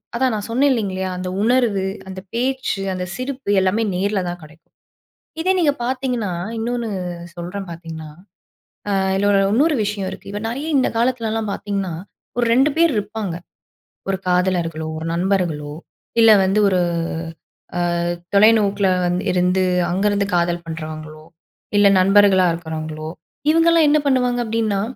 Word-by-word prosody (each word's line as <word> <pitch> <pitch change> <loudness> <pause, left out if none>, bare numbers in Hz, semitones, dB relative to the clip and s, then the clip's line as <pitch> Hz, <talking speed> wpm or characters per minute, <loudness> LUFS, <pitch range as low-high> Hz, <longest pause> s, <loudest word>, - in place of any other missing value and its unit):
அதான் 255 0 +1
நான் 210 -1 -4
சொன்னேன் 265 +5 +3
இல்லைங்களா 190 -6 -1
அந்த 185 0 -4
உணர்வு, 235 -4 +2 0.3
அந்த 190 0 -7
பேச்சு, 255 -3 -1
அந்த 180 0 -3
சிரிப்பு 260 -1 -5
எல்லாமே 190 +4 +1
நேர்ல 200 +2 0
தான் 175 0 -4
கெடைக்கும். 155 +1 -17 0.7
இதே 370 +3 +2
நீங்க 300 -5 +3
பார்த்தீங்கன்னா, 250 -5 -2 0.3
இன்னொன்னு 235 0 -2 0.5
சொல்றேன் 180 +3 -6
பார்த்தீங்கன்னா, 165 -2 -8 0.9
அ - - +2 0.2
இதில 200 0 +3
இன்னொரு 295 +7 +3
விஷயம் 200 -2 -2
இருக்கு. - - -10
இப்ப 205 - -4
நெறைய, 270 +6 -4
இந்த 260 - +2
காலத்துலலாம் 225 -3 0
பார்த்தீங்கன்னா, 200 -4 -3 0.5
ஒரு 240 - +2
2 270 +4 +4
பேர் 335 -2 +4
இருப்பாங்க. 210 -3 -3 0.8
ஒரு 195 - 0
காதலர்களோ, 180 -3 0
ஒரு 160 - -5
நண்பர்களோ, 170 -5 -1 0.5
இல்ல 225 -1 +8
வந்து 195 +3 +2
ஒரு 185 -2 +2 1.0
அ - - 0 0.6
தொலைநோக்கில 205 -1 +4 0.2
வந்து 175 +2 0
இருந்து 180 +1 +2 0.3
அங்கருந்து 200 +2 +1
காதல் 170 0 0
பண்ணுறவங்களோ, 155 -1 -7 0.5
இல்ல 205 0 +6
நண்பர்களா 195 0 +5
இருக்கிறவங்களோ 155 -1 -5 0.4
இவங்கலாம் 330 -1 +4
என்ன 300 - +4
பண்ணுவாங்க 250 -3 +2
அப்படின்னா, 220 -3 0
200 Hz, 130 wpm, -20 LUFS, 180-235 Hz, 1.0 s, இல்ல